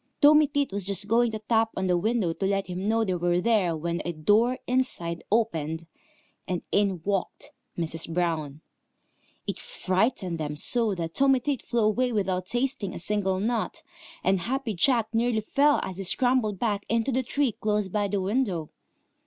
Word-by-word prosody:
Tommy 300 0 +7
Tit 285 -3 -1
was 200 0 -3
just 200 +1 -1
going 235 +2 +3
to 220 - -4
tap 225 +1 +1
on 190 - 0
the 180 -1 +2
window 200 -1 +1
to 195 - -2
let 195 0 0
him 185 +2 -4
know 225 +1 +2
they 190 -4 -1
were 175 0 +1
there, 185 -5 +2
when 170 +2 -2
a 175 - -2
door 210 +10 +2
inside 175 -10 -1
opened, 165 -8 0 0.6
and 180 -2 -2
in 195 -4 +1
walked 195 -2 -2 0.3
Mrs. 165 -1 -1
Brown. 160 -4 -1 0.8
It - - -4
frightened 190 - -1
them 150 -1 -3
so 220 +6 +1
that 165 -2 -4
Tommy 270 -1 +4
Tit 275 0 -2
flew 235 -1 -1
away 235 +4 +2
without 190 -4 -1
tasting 245 -5 -1
a - - -4
single 190 +1 -1
nut, 225 +2 -2 0.4
and 190 0 +2
Happy 250 +4 -2
Jack 230 +3 +2
nearly 225 -1 +1
fell 285 +7 +3
as 185 - -6
he 195 - -4
scrambled 240 0 +1
back 205 -1 -1
into 230 +3 +1
the 260 +1 +1
tree 265 +1 0
close 210 -1 -1
by 205 +2 0
the 200 0 -1
window. 190 - -1
205 Hz, 180 wpm, -26 LUFS, 180-235 Hz, 0.8 s, Tommy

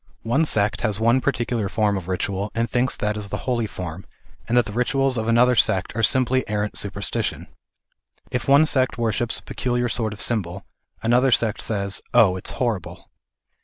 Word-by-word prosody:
One 140 +8 +1
sect 105 -2 +1
has 110 -2 -1
one 115 +3 +3
particular 120 -6 -1
form 105 -1 +1
of 95 -3 -5
ritual, 95 +2 -2
and 115 0 +1
thinks 125 +1 0
that 105 0 -1
is 105 -1 -5
the - - -5
holy 120 -3 0
form, 90 -2 -7 0.4
and 120 - +1
that 120 - +4
th<\ 105 0 -7
rituals 135 +2 +1
of 110 -1 -2
another 120 +2 +4
sect 95 -3 +1
are 110 - 0
simply 130 +3 +2
arrant 105 0 -1
supersti 100 0 -3
tion. - - -4 0.8
If 125 - -2
one 140 +3 +6
sect 130 -5 +1
worships 120 0 -1
a - - -8
peculiar 120 -1 -1
sort 110 -1 -2
of 105 - -11
symbol, 95 -5 -2 0.4
another 125 +3 +3
sect 110 -2 +2
says 100 -2 -2
" - - -12
Oh, 100 -6 +6
it's 95 - -6
horrible." 115 -9 -3
115 Hz, 190 wpm, -23 LUFS, 100-125 Hz, 0.8 s, one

